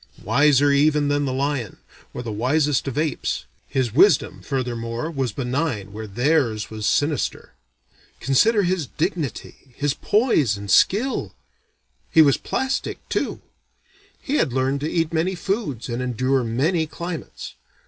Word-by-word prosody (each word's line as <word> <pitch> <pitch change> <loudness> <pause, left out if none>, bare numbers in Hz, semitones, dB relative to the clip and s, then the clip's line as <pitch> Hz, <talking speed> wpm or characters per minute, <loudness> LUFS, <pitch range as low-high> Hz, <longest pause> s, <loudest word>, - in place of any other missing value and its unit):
Wiser 140 +4 +4
even 145 +1 +3
than 145 0 +1
the 135 - -1
lion, 130 -4 -2 0.3
or 120 - -6
the 115 - -4
wisest 140 +6 +1
of 135 0 -4
apes, 150 - -1 0.2
his 125 -5 -1
wisdom 195 - +4
furthermore 120 +1 -3
was 135 -6 -2
benign 125 -5 -2
where 110 +1 -6
theirs 120 -1 0
was 110 0 -3
sinister. 145 -2 -1 0.7
Consider 205 - +3
his 175 -5 0
dignity, 140 -5 -4
his 145 -1 0
poise 155 - +2
and 100 -1 -5
skill. 230 - +2 0.7
He 160 - +6
was 140 -3 +4
plastic, 265 +1 -2
too. - - -2 0.8
He 285 +2 -1
had 125 - +1
learned 135 +2 0
to 155 - -2
eat 165 -1 0
many 170 +4 0
foods 175 - -3
and 120 +1 -3
endure 130 +1 0
many 155 +9 0
climates. 170 +1 -7
140 Hz, 140 wpm, -22 LUFS, 120-160 Hz, 0.8 s, He